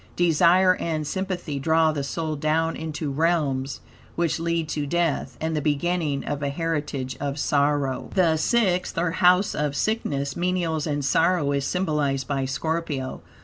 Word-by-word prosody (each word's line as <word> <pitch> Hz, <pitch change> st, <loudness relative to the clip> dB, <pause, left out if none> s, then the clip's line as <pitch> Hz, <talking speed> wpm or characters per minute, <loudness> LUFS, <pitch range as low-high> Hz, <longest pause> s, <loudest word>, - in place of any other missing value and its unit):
Desire 175 Hz, +2 st, +4 dB
and 155 Hz, -2 st, -2 dB
sympathy 180 Hz, -4 st, -3 dB
draw 160 Hz, +2 st, +3 dB
the 145 Hz, -2 st, -3 dB
soul 155 Hz, +2 st, -3 dB
down 160 Hz, +2 st, 0 dB
into 155 Hz, -2 st, -4 dB
realms 145 Hz, -3 st, 0 dB, 0.3 s
which 170 Hz, -1 st, 0 dB
lead 165 Hz, -1 st, -1 dB
to 145 Hz, -2 st, -2 dB
death, 170 Hz, -1 st, -1 dB
and 160 Hz, 0 st, -2 dB
the 150 Hz, -, 0 dB
beginning 150 Hz, 0 st, 0 dB
of 145 Hz, -1 st, -3 dB
a 140 Hz, -, -1 dB
heritage 145 Hz, -4 st, -3 dB
of 140 Hz, 0 st, -3 dB
sorrow, 145 Hz, -2 st, 0 dB
The 170 Hz, -4 st, +3 dB
Sixth, 185 Hz, -1 st, +1 dB
or 165 Hz, 0 st, +1 dB
House 180 Hz, +2 st, +4 dB
of 150 Hz, -1 st, -1 dB
Sickness, 140 Hz, -8 st, -1 dB
Menials, 170 Hz, -3 st, -1 dB
and 145 Hz, -2 st, -1 dB
Sorrow, 165 Hz, -1 st, +2 dB
is 140 Hz, -1 st, 0 dB
symbolized 150 Hz, -7 st, 0 dB
by 135 Hz, -2 st, -1 dB
Scorpio. 145 Hz, -1 st, -3 dB
155 Hz, 150 wpm, -24 LUFS, 140-170 Hz, 0.3 s, Desire